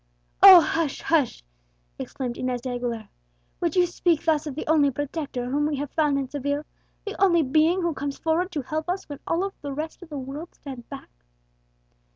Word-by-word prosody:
"Oh! 380 Hz, -3 st, +11 dB
hush! 320 Hz, -2 st, -1 dB
hush!" 295 Hz, -, +1 dB, 0.6 s
exclaimed 250 Hz, -3 st, -4 dB
Inez 250 Hz, -1 st, -2 dB
de 255 Hz, -, -5 dB
Aguilera; 240 Hz, -3 st, -4 dB, 0.5 s
"would 340 Hz, -1 st, -1 dB
you 360 Hz, -1 st, +5 dB
speak 345 Hz, -2 st, 0 dB
thus 310 Hz, -2 st, +1 dB
of 280 Hz, -, -5 dB
the 310 Hz, -, -4 dB
only 300 Hz, -2 st, +4 dB
protector 280 Hz, -2 st, -4 dB
whom 295 Hz, +2 st, +1 dB
we 305 Hz, -, -1 dB
have 285 Hz, 0 st, -4 dB
found 295 Hz, -3 st, +1 dB
in 275 Hz, -1 st, -2 dB
Seville, 285 Hz, +2 st, -2 dB, 0.4 s
the 415 Hz, -, -5 dB
only 340 Hz, -4 st, +4 dB
being 315 Hz, +6 st, +2 dB
who 340 Hz, -1 st, 0 dB
comes 280 Hz, 0 st, -4 dB
forward 335 Hz, +3 st, 0 dB
to 295 Hz, -4 st, -2 dB
help 310 Hz, +5 st, -4 dB
us 375 Hz, +2 st, -2 dB
when 290 Hz, -2 st, -8 dB
all 375 Hz, +4 st, 0 dB
the 285 Hz, -1 st, -5 dB
rest 310 Hz, +5 st, -5 dB
of 355 Hz, -, -12 dB
the 295 Hz, -, -6 dB
world 275 Hz, +6 st, -7 dB
stand 260 Hz, -4 st, -10 dB
back?" 275 Hz, -1 st, -9 dB
295 Hz, 190 wpm, -25 LUFS, 275-330 Hz, 0.6 s, Oh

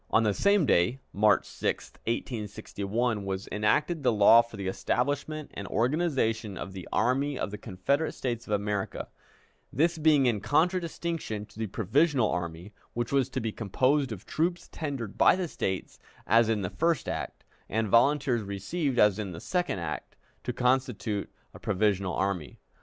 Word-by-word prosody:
On 115 Hz, -, +4 dB
the 105 Hz, -2 st, +2 dB
same 200 Hz, -, +3 dB
day 105 Hz, +5 st, +3 dB
(March 105 Hz, -1 st, +4 dB
6, -, -, -3 dB
1861) 110 Hz, -1 st, -2 dB
was 95 Hz, 0 st, -4 dB
enacted 145 Hz, +10 st, +1 dB
the 130 Hz, -, +3 dB
law 110 Hz, +2 st, +7 dB
for 115 Hz, -2 st, -11 dB
the 100 Hz, -1 st, -4 dB
establishment 145 Hz, +9 st, -1 dB
and 100 Hz, -, -6 dB
organization 115 Hz, -, 0 dB
of 95 Hz, -, -6 dB
the 95 Hz, -2 st, -8 dB
Army 135 Hz, +4 st, +1 dB
of -, -, -3 dB
the 105 Hz, -, -6 dB
Confederate 140 Hz, -, -1 dB
States 120 Hz, -3 st, -3 dB
of 105 Hz, -, -2 dB
America, 105 Hz, -1 st, -2 dB, 0.6 s
this 165 Hz, +4 st, +1 dB
being 150 Hz, -3 st, +5 dB
in 115 Hz, -4 st, +2 dB
contradistinction 165 Hz, -, -1 dB
to 105 Hz, +1 st, -16 dB
the 110 Hz, -, -1 dB
provisional 125 Hz, -, +2 dB
army, 85 Hz, +3 st, -4 dB, 0.2 s
which 120 Hz, -1 st, -2 dB
was 135 Hz, -3 st, +2 dB
to -, -, -3 dB
be 110 Hz, -1 st, -2 dB
composed 130 Hz, +6 st, +1 dB
of 105 Hz, -2 st, -7 dB
troops 175 Hz, +2 st, -1 dB
tendered 135 Hz, -10 st, -5 dB
by -, -, +7 dB
the 185 Hz, -1 st, -2 dB
States, 95 Hz, -, -4 dB, 0.3 s
as 115 Hz, 0 st, +4 dB
in 105 Hz, -3 st, 0 dB
the 90 Hz, -, -3 dB
first 165 Hz, -4 st, 0 dB
act, -, -, -4 dB, 0.3 s
and 110 Hz, +1 st, 0 dB
volunteers 125 Hz, +2 st, +3 dB
received, 120 Hz, -, -2 dB
as 105 Hz, -2 st, +4 dB
in 100 Hz, -4 st, -4 dB
the 80 Hz, -, -7 dB
second 180 Hz, -, -1 dB
act, 85 Hz, -4 st, -5 dB, 0.3 s
to -, -, -2 dB
constitute 125 Hz, -4 st, 0 dB, 0.2 s
a -, -, -11 dB
provisional 100 Hz, -2 st, 0 dB
army. 90 Hz, -7 st, -2 dB
115 Hz, 165 wpm, -28 LUFS, 100-145 Hz, 0.6 s, law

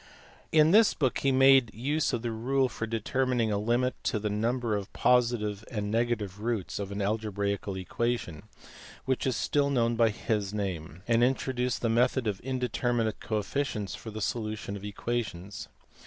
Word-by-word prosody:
In 155 Hz, 0 st, +5 dB
this 215 Hz, +2 st, +6 dB
book 130 Hz, -4 st, 0 dB
he 140 Hz, -, +2 dB
made 135 Hz, -3 st, +6 dB
use 145 Hz, +7 st, 0 dB
of 120 Hz, -3 st, -2 dB
the 120 Hz, -, -1 dB
rule 130 Hz, +4 st, +1 dB
for 115 Hz, -, -4 dB
determining 115 Hz, +1 st, 0 dB
a 100 Hz, -, 0 dB
limit 120 Hz, +4 st, +1 dB
to -, -, +1 dB
the 105 Hz, 0 st, -2 dB
number_of_positive 110 Hz, -1 st, +1 dB
and 115 Hz, -, -7 dB
of 105 Hz, 0 st, -2 dB
negative 105 Hz, -5 st, -3 dB
roots 110 Hz, -5 st, -2 dB
of 100 Hz, -1 st, -4 dB
an 100 Hz, 0 st, -2 dB
algebraical 100 Hz, -2 st, -2 dB
equation, 95 Hz, -2 st, -2 dB, 0.6 s
which 130 Hz, 0 st, 0 dB
is 130 Hz, -, +1 dB
still 140 Hz, +4 st, +1 dB
known 120 Hz, -4 st, +2 dB
by 115 Hz, -1 st, +4 dB
his 105 Hz, -2 st, -2 dB
name; 90 Hz, -4 st, -4 dB
and 115 Hz, 0 st, +4 dB
introduced 125 Hz, -1 st, 0 dB
the -, -, +3 dB
method 125 Hz, +2 st, +2 dB
of 105 Hz, -3 st, -1 dB
indeterminate 120 Hz, -3 st, -1 dB
coefficients 110 Hz, -1 st, -2 dB
for 115 Hz, -, -8 dB
the 110 Hz, 0 st, -6 dB
solution 110 Hz, -2 st, -3 dB
of 100 Hz, -, -8 dB
equations. 105 Hz, -2 st, -4 dB
115 Hz, 160 wpm, -29 LUFS, 105-125 Hz, 0.6 s, this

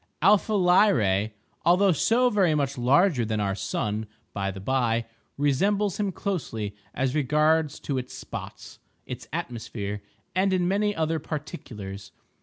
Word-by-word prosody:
Alpha 210 Hz, +3 st, +4 dB
Lyrae, 130 Hz, -, +4 dB, 0.3 s
although 185 Hz, +3 st, +5 dB
so 240 Hz, -, +3 dB
very 185 Hz, -7 st, +3 dB
much 140 Hz, -2 st, 0 dB
larger 135 Hz, +3 st, +3 dB
than 110 Hz, -1 st, -1 dB
our 100 Hz, -1 st, 0 dB
sun, 105 Hz, +3 st, -2 dB, 0.3 s
by 100 Hz, -1 st, -1 dB
the 95 Hz, 0 st, -6 dB
by, 115 Hz, +1 st, +1 dB, 0.3 s
resembles 195 Hz, +9 st, +1 dB
him 205 Hz, -2 st, 0 dB
closely 120 Hz, -, -3 dB, 0.2 s
as 130 Hz, -1 st, 0 dB
regards 150 Hz, +1 st, +2 dB
its 130 Hz, -3 st, -2 dB
spots, -, -, -8 dB, 0.3 s
its 125 Hz, -2 st, -7 dB
atmosphere, 115 Hz, -9 st, -4 dB, 0.3 s
and 190 Hz, +1 st, +2 dB
in 180 Hz, -1 st, +2 dB
many 205 Hz, +2 st, +1 dB
other 160 Hz, 0 st, 0 dB
particulars. 105 Hz, -, -7 dB
145 Hz, 130 wpm, -26 LUFS, 110-185 Hz, 0.3 s, although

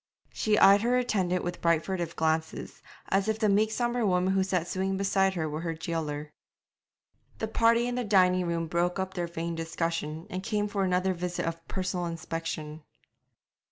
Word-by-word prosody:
She 210 Hz, -1 st, +1 dB
eyed 200 Hz, +1 st, +7 dB
her 245 Hz, +2 st, +2 dB
attendant 190 Hz, -7 st, 0 dB
with 175 Hz, 0 st, -4 dB
bright 170 Hz, -1 st, +2 dB
furtive 175 Hz, -3 st, -3 dB
glances, 160 Hz, 0 st, -1 dB, 0.3 s
as 195 Hz, +2 st, +2 dB
if 220 Hz, 0 st, +1 dB
the 220 Hz, -1 st, +2 dB
meek 210 Hz, +2 st, +3 dB
sombre 240 Hz, +1 st, 0 dB
woman 185 Hz, -1 st, +2 dB
who 195 Hz, -, +3 dB
sat 180 Hz, -3 st, -1 dB
sewing 190 Hz, +1 st, -1 dB
beside 195 Hz, -1 st, +2 dB
her 160 Hz, -3 st, -1 dB
were 155 Hz, +1 st, -4 dB
her 165 Hz, -1 st, -3 dB
jailer. 155 Hz, -2 st, -4 dB, 1.0 s
The 220 Hz, -, -2 dB
party 230 Hz, +2 st, +3 dB
in 245 Hz, -, -2 dB
the 250 Hz, 0 st, -1 dB
dining 185 Hz, -4 st, +3 dB
room 170 Hz, -1 st, -1 dB
broke 175 Hz, +3 st, 0 dB
up 190 Hz, 0 st, -3 dB
their 175 Hz, -2 st, -2 dB
vain 170 Hz, 0 st, -4 dB
discussion, 165 Hz, -1 st, -3 dB
and 185 Hz, -, -3 dB
came 210 Hz, 0 st, -1 dB
for 205 Hz, -1 st, -1 dB
another 185 Hz, 0 st, +1 dB
visit 175 Hz, 0 st, -3 dB
of 165 Hz, 0 st, -5 dB
personal 185 Hz, -2 st, -2 dB
inspection. 165 Hz, -2 st, -5 dB
180 Hz, 180 wpm, -28 LUFS, 165-200 Hz, 1.0 s, eyed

